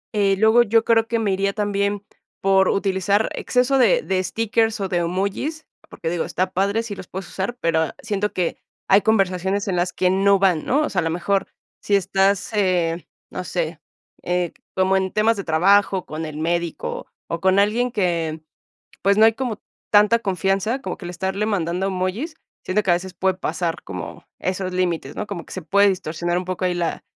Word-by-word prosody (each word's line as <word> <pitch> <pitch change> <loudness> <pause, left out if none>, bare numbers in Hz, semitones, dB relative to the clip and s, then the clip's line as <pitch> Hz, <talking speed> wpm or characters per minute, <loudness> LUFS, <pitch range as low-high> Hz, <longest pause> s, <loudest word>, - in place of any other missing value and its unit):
Eh 200 -2 +3
luego, 220 +3 +5
yo 225 0 +3
creo 225 -1 +3
que 230 - 0
me 220 -3 0
iría 195 +1 0
también 205 -1 -1 0.4
por 190 -1 +3
utilizar 200 +2 +1
exceso 255 +2 +1
de - - +4
de 185 -1 0
stickers 225 +2 0
o 195 - -1
de 180 - -1
emojis, 195 - -2 0.2
porque, 165 - -5
digo, 170 -1 -1
está 185 0 -1
padre 200 +4 +1
si 225 -3 -6
los 190 - -10
puedes 190 -1 -7
usar, 200 +6 -3
pero 160 -1 +1
siento 210 -1 -1
que 175 -2 -2 0.3
hay 195 +1 +6
conversaciones 195 -1 +1
en 190 - 0
las 175 +1 0
que 180 0 +1
no 195 +1 +4
van, 185 -5 +2
¿no? 285 +4 +2
O - - -1
sea, 195 - 0
a - - +1
lo 165 - 0
mejor, 190 +4 0 0.3
si 205 - +1
estás, 195 0 +1
eh, 180 -5 0 0.2
no - - -4
sé, 165 -3 -3 0.4
eh, 180 -1 -1 0.2
como 190 0 +3
en 190 -1 -1
temas 215 +2 +2
de 200 - -5
trabajo, 190 +4 +3
con 155 +1 -5
el 150 -1 -7
médico, 170 +1 -2 0.2
o 165 0 -4
con 190 +1 +3
alguien 225 +5 +2
que, 170 -6 -1 0.6
pues, 200 +2 +3
no 220 - +7
hay 225 - +6
como 225 -2 -4 0.3
tanta 210 +3 +5
confianza, 195 +5 0
como - - -5
que 180 - -9
el - - -5
estarle 190 +3 -2
mandando 180 -2 -1
emojis, 195 - -2 0.3
siendo 205 +3 0
que 190 - +1
a - - +5
veces 180 +1 -5
puede 190 +1 +1
pasar 170 -3 -2
como 90 -2 -7
esos 185 0 -2
límites, 175 -6 -1
¿no? 210 - -3
Como 195 -5 -6
que - - -13
se 185 - -5
puede 200 +5 +4
distorsionar 175 -2 -1
un 180 - -4
poco 185 0 -3
ahí 180 - 0
la 175 -1 -2
190 Hz, 200 wpm, -22 LUFS, 180-205 Hz, 0.6 s, no